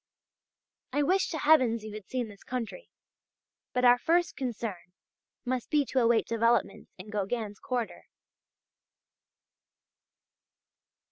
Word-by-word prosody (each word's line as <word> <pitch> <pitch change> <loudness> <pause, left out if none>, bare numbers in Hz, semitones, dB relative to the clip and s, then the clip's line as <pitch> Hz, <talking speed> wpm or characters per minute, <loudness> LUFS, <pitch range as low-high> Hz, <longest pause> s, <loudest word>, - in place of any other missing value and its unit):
I 290 - +1
wish 375 +6 +2
to 320 - -3
Heavens 260 -7 +4
you 215 -1 -7
had 210 -2 -9
seen 250 -3 -2
this 205 -2 -14
country! 255 - -5 0.8
But 250 -1 +1
our 245 0 +7
first 345 +4 +2
concern 220 -9 -5 0.5
must 250 -1 -2
be 295 -2 +3
to 265 - 0
await 235 -1 +3
developments 230 -3 +1
in 200 +3 -10
Gauguin's 205 0 -3
quarter. 245 -3 -3
240 Hz, 115 wpm, -29 LUFS, 215-260 Hz, 0.8 s, our